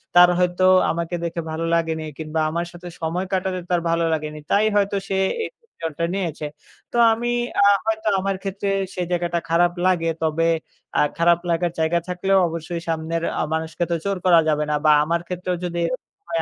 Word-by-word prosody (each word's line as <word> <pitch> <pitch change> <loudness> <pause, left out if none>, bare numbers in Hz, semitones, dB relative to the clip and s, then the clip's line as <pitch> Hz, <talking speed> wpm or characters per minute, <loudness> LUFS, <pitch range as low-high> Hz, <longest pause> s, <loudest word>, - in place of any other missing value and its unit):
তার 175 0 +9
হয়তো 180 0 +1 0.3
আমাকে 170 +1 -3
দেখে 170 0 -2
ভালো 160 +1 -2
লাগেনি 160 -1 0
কিংবা 160 0 -3
আমার 170 +2 -2
সাথে 175 0 -10
সময় 170 +3 -1
কাটাতে 185 -1 0
তার 175 - +2
ভালো 165 0 +1
লাগেনি 155 -1 -3
তাই 205 +2 +4
হয়তো 200 0 +2
সে 195 - 0 0.3
এই - - -4
ডিসিশনটা 165 - -4
নিয়েছে। 170 -6 -3 0.5
তো 240 - -2 0.2
আমি 235 +2 -2 0.3
আ - - +6 0.2
হয়তো 220 0 -1
আমার 195 0 -1
ক্ষেত্রে 195 0 -3 0.3
সে 180 - -2
জায়গাটা 175 -1 0
খারাপ 175 +1 +4
লাগে। 170 -3 +2
তবে 160 +1 +1 0.5
আ - - +5 0.2
খারাপ 170 0 +4
লাগার 170 0 +1
জায়গা 160 +2 +2
থাকলেও 190 +2 +1
অবশ্যই 165 +1 -5
সামনের 165 +1 -2 0.2
আ - - +1
মানুষকে 160 +1 -2
তো 170 - +2
জোর 200 -1 -1
করা 175 -2 +7
যাবে 150 0 +1
না - - +2
বা 155 - +7
আমার 170 +2 0
ক্ষেত্রেও 180 0 -2
যদি 175 -1 -3
এরকম 255 - -6
হয়, 335 - -1
170 Hz, 185 wpm, -22 LUFS, 165-185 Hz, 0.5 s, তার